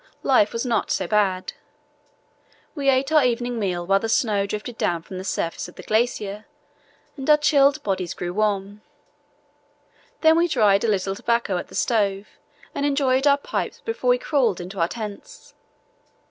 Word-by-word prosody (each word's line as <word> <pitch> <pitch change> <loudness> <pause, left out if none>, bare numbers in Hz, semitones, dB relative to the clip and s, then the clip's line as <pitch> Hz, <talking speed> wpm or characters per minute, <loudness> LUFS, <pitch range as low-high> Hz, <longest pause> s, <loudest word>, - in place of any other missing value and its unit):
Life 250 -6 +3
was 230 +2 -3
not 230 -3 0
so 190 - 0
bad. 190 -1 0 1.2
We 280 -3 0
ate 270 +2 +2
our 305 -2 +5
evening 240 -1 -1
meal 180 -4 -2
while 195 +2 +3
the 225 - -3
snow 210 -4 +1
drifted 210 +3 -5
down 170 -2 0
from 185 +1 -8
the - - -6
surface 170 -3 -3
of 180 - -14
the - - -10
glacier, 215 -2 -1 0.7
and 270 0 -5
our 300 - +7
chilled 290 -1 +3
bodies 190 -3 -2
grew 175 0 -4
warm. 205 0 -1 1.4
Then 320 0 +5
we 345 - +3
dried 210 - +3
a - - +1
little 195 -2 0
tobacco 235 -2 -1
at 175 - -5
the - - -13
stove 200 -3 0 0.4
and 280 - -3
enjoyed 275 -1 +2
our 280 0 +5
pipes 280 - -4
before 460 +2 -2
we - - +5
crawled 280 - 0
into 180 +2 -7
our 165 - +2
tents. 220 - -9
220 Hz, 170 wpm, -23 LUFS, 195-275 Hz, 1.4 s, our